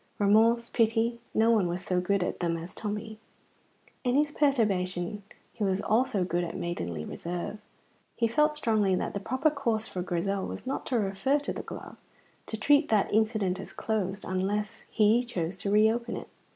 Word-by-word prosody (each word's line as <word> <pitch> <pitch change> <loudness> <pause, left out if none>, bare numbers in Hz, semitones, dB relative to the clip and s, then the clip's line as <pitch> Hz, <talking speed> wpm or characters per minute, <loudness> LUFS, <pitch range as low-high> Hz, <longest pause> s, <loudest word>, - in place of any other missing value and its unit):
Remorse, 225 +3 +4
pity, 230 +1 +1
no 225 +1 +3
one 210 -6 +3
was 175 +2 -3
so 180 -1 +1
good 195 +1 +1
at - - -3
them 170 -2 0
as 170 +3 -7
Tommy. 215 +1 -5 0.8
In 245 0 +1
his 295 +1 +3
perturbation 205 - +1 0.3
he 220 - -4
was 190 -1 +1
also 220 -1 +1
good 175 0 0
at 170 - -4
maidenly 85 - -3
reserve. 175 +5 -5 0.6
He 230 - +2
felt 300 +6 +2
strongly 215 -9 +2
that - - -2
the 200 - -2
proper 260 +9 +1
course 235 -7 0
for 180 - -4
Grizel 190 +2 -1
was - - -7
not 265 - -3
to 250 - +1
refer 210 +7 +1
to 285 - -3
the - - -5
glove - - -9 0.5
to 220 - -4
treat 290 +7 +4
that 210 -2 +2
incident 215 -4 +1
as - - -8
closed, 205 -3 -2
unless 205 +4 -2
he 220 +3 +4
chose 185 -7 -3
to 200 - -3
reopen 220 +3 +3
it. - - -8
210 Hz, 180 wpm, -29 LUFS, 185-235 Hz, 0.8 s, Remorse